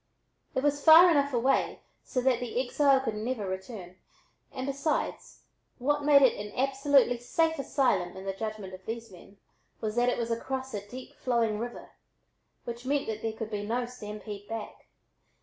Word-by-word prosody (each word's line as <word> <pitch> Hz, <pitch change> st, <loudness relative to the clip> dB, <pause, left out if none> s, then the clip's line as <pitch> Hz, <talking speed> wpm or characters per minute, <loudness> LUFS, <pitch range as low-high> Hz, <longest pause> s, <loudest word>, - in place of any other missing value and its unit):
It 260 Hz, -, 0 dB
was 290 Hz, 0 st, +1 dB
far 335 Hz, +2 st, +9 dB
enough 285 Hz, -2 st, +2 dB
away 255 Hz, +2 st, +1 dB, 0.2 s
so 255 Hz, -, -2 dB
that 250 Hz, -1 st, +2 dB
the 245 Hz, -1 st, -3 dB
exile 270 Hz, +1 st, +3 dB
could 260 Hz, -, -2 dB
never 215 Hz, 0 st, -3 dB
return, 190 Hz, -1 st, -7 dB, 0.5 s
and 260 Hz, -, -5 dB
besides, 280 Hz, +3 st, -2 dB, 0.3 s
what 290 Hz, +3 st, 0 dB
made 285 Hz, -1 st, +6 dB
it 235 Hz, -5 st, +3 dB
an 210 Hz, -, -8 dB
absolutely 270 Hz, -2 st, +3 dB
safe 320 Hz, +6 st, 0 dB
asylum 220 Hz, -11 st, 0 dB
in 190 Hz, -, -8 dB
the 195 Hz, -, -2 dB
judgment 210 Hz, -2 st, -5 dB
of 185 Hz, 0 st, -10 dB
these 230 Hz, -1 st, -5 dB
men 195 Hz, +2 st, -15 dB, 0.4 s
was 215 Hz, -1 st, -3 dB
that 245 Hz, +1 st, +4 dB
it -, -, 0 dB
was 235 Hz, -1 st, -2 dB
across 265 Hz, +3 st, -3 dB
a 205 Hz, -, -3 dB
deep 255 Hz, +2 st, -9 dB
flowing 230 Hz, -4 st, 0 dB
river, 240 Hz, +1 st, -7 dB, 0.7 s
which 235 Hz, 0 st, -6 dB
meant 280 Hz, +2 st, 0 dB
that 220 Hz, -1 st, -4 dB
there 225 Hz, -1 st, -2 dB
could 220 Hz, 0 st, -6 dB
be 205 Hz, -1 st, -3 dB
no 240 Hz, +4 st, -1 dB
"stampede" 210 Hz, -3 st, -8 dB
back. 225 Hz, -1 st, -7 dB
240 Hz, 175 wpm, -29 LUFS, 215-270 Hz, 0.7 s, far